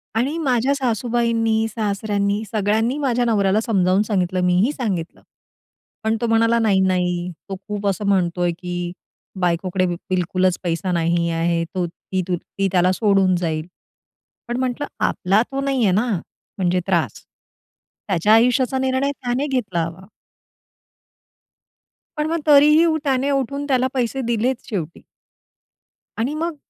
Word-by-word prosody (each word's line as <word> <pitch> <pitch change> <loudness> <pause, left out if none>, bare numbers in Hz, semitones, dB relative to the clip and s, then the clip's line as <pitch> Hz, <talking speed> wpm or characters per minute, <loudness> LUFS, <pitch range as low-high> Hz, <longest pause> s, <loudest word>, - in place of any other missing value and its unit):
आणि 270 +8 0
माझ्या 265 -3 +1
सासूबाईंनी, 230 -3 0
सासऱ्यांनी 205 -1 -1
सगळ्यांनी 220 +5 +1
माझ्या 245 -4 +1
नवऱ्याला 205 -3 +2
समजावून 190 -4 +2
सांगितलं, 185 -4 0
मीही 180 +9 +3
सांगितलं. 195 - -4 0.8
पण 220 0 +1
तो 235 - +1
म्हणाला 230 +1 +3
"नाही, 210 -4 +3
नाही 180 -1 0 0.2
तो 195 - -3
खूप 205 -1 -3
असं 200 +1 -1
म्हणतोय, 175 -2 +1
की 175 -1 -4 0.5
बायकोकडे 180 +1 0
बिलकुलच 180 +1 0
पैसा 175 +1 -1
नाही 170 0 +1
आहे. 165 0 0
तो, 180 0 -3
ती, 185 +2 -4
ती 195 +3 -3
त्याला 180 0 +3
सोडून 195 -2 +3
जाईल." 160 -2 -2 0.8
पण 240 +1 -2
म्हटलं 260 +3 -2 0.2
"आपला 195 +4 +2
तो 275 0 -2
नाही 270 -3 0
आहे 190 - +3
ना, 235 +4 +1 0.5
म्हणजे 180 -1 +1
त्रास." - - 0 0.8
त्याच्या 195 +3 +3
आयुष्याचा 250 +3 +3
निर्णय 265 +2 0
त्याने 260 +1 -2
घेतला 205 - -1
हवा. 175 +3 -9 2.1
पण 300 0 0
मग 335 +1 -1
तरीही 300 +3 +6 0.2
त्याने 270 -1 +1
उठून 280 +1 -1
त्याला 260 -2 +2
पैसे 260 +1 -1
दिलेच 235 +2 0
शेवटी. 170 -6 -4 1.2
आणि 250 +6 -1
मग 330 +1 -2
210 Hz, 130 wpm, -21 LUFS, 180-250 Hz, 2.1 s, तरीही